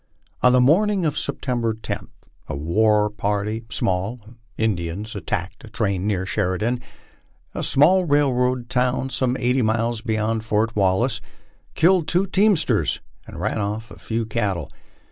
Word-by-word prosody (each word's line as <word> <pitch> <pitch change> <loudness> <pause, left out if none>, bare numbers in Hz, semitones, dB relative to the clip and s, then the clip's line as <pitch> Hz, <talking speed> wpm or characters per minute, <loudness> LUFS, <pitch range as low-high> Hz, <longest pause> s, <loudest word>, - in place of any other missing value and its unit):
On 125 - +6
the 125 - +5
morning 185 +8 +3
of 150 -2 0
September 120 -6 -2
10, 110 - -5 0.4
a - - -3
small - - -3
war 105 +4 +3
party 105 +2 -2
of 105 +5 -2 0.2
Indians 100 0 -2
attacked 100 +4 -4
train 100 -4 -1
near 95 -3 0
Sheridan, 105 +5 -1 0.7
a - - -3
small 180 +7 +4
railroad 130 -4 +2
town 125 +1 0
some 125 +1 0
eighty 125 +1 +2
miles 115 0 0
beyond 110 -1 -1
Fort 110 +1 0
Wal 95 0 +3
lace, 120 -2 -1 0.5
killed 170 -1 +4
two 180 +4 +2
teamsters 185 - +2 0.3
and 85 - -9
ran 110 +4 -1
off 105 +2 -3
a - - -12
few 115 0 -2
cattle. 100 -8 -2
115 Hz, 145 wpm, -22 LUFS, 105-130 Hz, 0.7 s, On